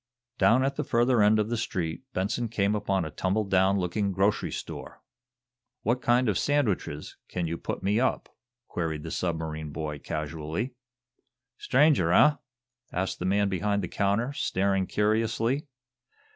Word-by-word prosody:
Down 125 +3 +5
at 140 - -2
the - - 0
further 120 0 +3
end 105 +1 +5
of 105 0 0
the 120 - -1
street 90 -7 -3
Benson 115 +4 -1
came 105 -2 +1
upon 95 -4 0
a 80 - -6
tumble 95 +7 0
down 95 0 +3
looking 100 +2 0
grocery 95 +2 +1
store. - - -7 0.8
"What 120 +3 +1
kind 120 +1 +3
of 100 -5 +1
sandwiches 110 - -1
can 90 -2 -2
you 85 0 -2
put - - -4
me 100 +3 +2
up?" 130 - 0 0.4
queried 80 -3 -3
the 80 - -6
submarine 80 -3 -3
boy, 75 -1 -4
casually. 80 - -4 0.9
"Stranger, 135 - +3
eh?" 150 +10 +6 0.5
asked 95 +2 -2
the - - -3
man 100 +2 +2
behind 100 +1 0
the - - -2
counter, 105 +9 0
staring 95 -6 0
curiously. 115 +6 0
100 Hz, 150 wpm, -27 LUFS, 90-115 Hz, 0.9 s, eh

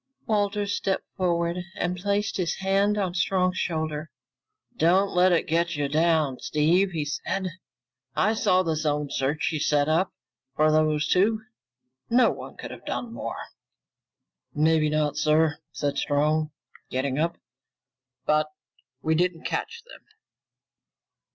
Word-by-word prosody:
Walters 205 -1 0
stepped 190 -1 -1
forward 170 -1 0 0.2
and 175 +1 -1
placed 200 +3 -1
his 175 -4 -1
hand 195 +2 +1
on 190 -4 -1
Strong's 185 0 +1
shoulder. 155 -2 -2 0.7
"Don't 185 +5 +3
let 180 +1 +4
it 170 - +2
get 170 +1 0
you 145 -1 0
down, 155 -3 +2
Steve," 170 +6 +2
he 160 -5 -3
said. 185 +6 -3 0.7
"I 215 - +3
saw 190 -4 +3
the 165 -3 0
zone 150 -2 -1
search 140 +3 0
you 155 - -2
set 145 -1 +2
up 165 +5 +2 0.4
for 155 +1 +4
those 155 -1 +2
two. 215 +5 +2 0.7
No 245 +2 +5
one - - -9
could - - -7
have - - -10
done 235 -1 -3
more." - - -5 1.2
"Maybe 155 0 +3
not, 150 -1 0
sir," 155 0 +3
said 145 -1 -2
Strong, 150 +1 +1 0.4
getting 130 +2 -1
up, 170 +2 0 0.9
"but 155 0 +2 0.6
we 160 - +2
didn't 175 0 0
catch 460 +1 -3
them." - - -14
165 Hz, 135 wpm, -26 LUFS, 150-190 Hz, 1.2 s, No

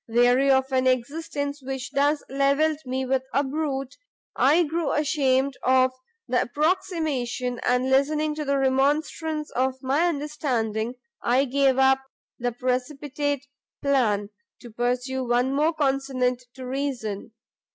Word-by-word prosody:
Weary 245 +4 +4
of 265 0 +3
an 260 0 +2
existence 285 +3 -2
which 265 0 -5
thus 290 +2 +1
levelled 280 +3 +2
me 260 +1 -1
with 260 0 +1
a 280 - +3
brute, 275 -2 -3 0.4
I 305 +6 +4
grew 325 -1 -1
ashamed 280 -3 +1
of 255 0 +4 0.4
the 250 - +2
approximation, 290 -5 -1
and 250 +1 +2
listening 300 +3 +2
to 305 0 -4
the 280 -1 +1
remonstrance 295 +3 0
of 260 +1 0
my 280 +6 +2
understanding, 255 -8 -2 0.3
I 255 +3 +2
gave 270 0 +2
up 265 0 +5 0.4
the 245 0 -1
precipitate 275 +3 -2 0.4
plan, 220 -7 +1 0.3
to 240 - -11
pursue 250 +3 -1
one 245 +2 +1
more 300 +4 +2
consonant 270 -4 0
to 260 0 -8
reason. 250 -6 -4
270 Hz, 130 wpm, -25 LUFS, 250-290 Hz, 0.4 s, up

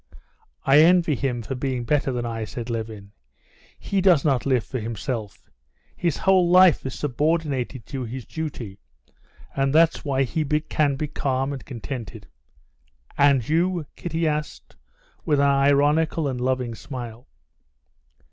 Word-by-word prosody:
"I 135 +2 +6
envy 170 0 +5
him 125 -3 -2
for 110 - -4
being 130 -1 -2
better 140 +2 +1
than 120 -1 -3
I," 115 -1 -3
said 115 +2 -6
Levin. 110 -3 -6 0.7
"He 195 -1 -1
does 180 -6 +4
not 135 -3 +1
live 130 -4 +2
for 130 - -5
himself. 110 -1 -5 0.5
His 170 -4 -1
whole 185 -2 +3
life 180 -1 +6
is 130 - -6
subordinated 145 -4 -1
to 135 -3 -5
his 120 +1 -7
duty. 125 -9 -6 0.8
And 135 +1 +1
that's 165 +1 +4
why 135 -3 +1
he 155 +5 -1
can 150 -1 0
be 150 +2 -3
calm 135 -1 -2
and 135 - -7
contented." 115 -4 -7 0.9
"And 140 -5 +3
you?" 170 +1 +1
Kitty 165 -1 -2
asked, 150 0 -4 0.5
with 150 -2 +1
an 140 - +4
ironical 145 +3 +3
and 125 -2 -3
loving 125 -2 -1
smile. 120 -1 -8
135 Hz, 140 wpm, -24 LUFS, 125-155 Hz, 0.9 s, I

